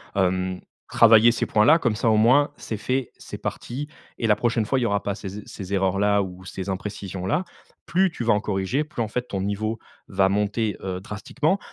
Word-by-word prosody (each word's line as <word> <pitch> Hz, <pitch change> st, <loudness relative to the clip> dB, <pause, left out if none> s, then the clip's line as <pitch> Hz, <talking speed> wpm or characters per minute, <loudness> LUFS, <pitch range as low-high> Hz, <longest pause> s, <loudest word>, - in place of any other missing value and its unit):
Hem, 95 Hz, -1 st, 0 dB, 0.3 s
travailler 115 Hz, 0 st, +6 dB
ces 115 Hz, -, -1 dB
points-là 120 Hz, +10 st, +5 dB
comme 120 Hz, -8 st, 0 dB
ça 115 Hz, +1 st, +1 dB
au 110 Hz, -, +4 dB
moins, 130 Hz, +7 st, +4 dB
c’est 110 Hz, -, -5 dB
fait, 130 Hz, +4 st, -2 dB
c’est -, -, -8 dB
parti, 140 Hz, +5 st, -5 dB, 0.3 s
et 115 Hz, -, -1 dB
la 105 Hz, -, +5 dB
prochaine 115 Hz, -1 st, +1 dB
fois 135 Hz, +5 st, +1 dB
il -, -, -1 dB
y -, -, +1 dB
aura 100 Hz, -2 st, 0 dB
pas 100 Hz, -, -2 dB
ces 100 Hz, 0 st, -7 dB
e -, -, -10 dB
ces 95 Hz, 0 st, -7 dB
erreurs-là 100 Hz, +1 st, +2 dB
ou 95 Hz, -1 st, -9 dB
ces 95 Hz, +2 st, -6 dB
imprécisions-là. 95 Hz, -, -3 dB, 0.4 s
Plus 190 Hz, +2 st, +2 dB
tu 160 Hz, -, -6 dB
vas 115 Hz, -, +4 dB
en 105 Hz, -, +2 dB
corriger, 105 Hz, +7 st, -1 dB
plus 150 Hz, -, -5 dB
en 110 Hz, -, 0 dB
fait 125 Hz, +2 st, -2 dB
ton 95 Hz, -, -3 dB
niveau 105 Hz, +3 st, -2 dB, 0.3 s
va 95 Hz, -1 st, +2 dB
monter, 105 Hz, +1 st, 0 dB
heu, 95 Hz, -1 st, -4 dB
drastiquement. 140 Hz, -, -1 dB
105 Hz, 210 wpm, -24 LUFS, 95-120 Hz, 0.4 s, travailler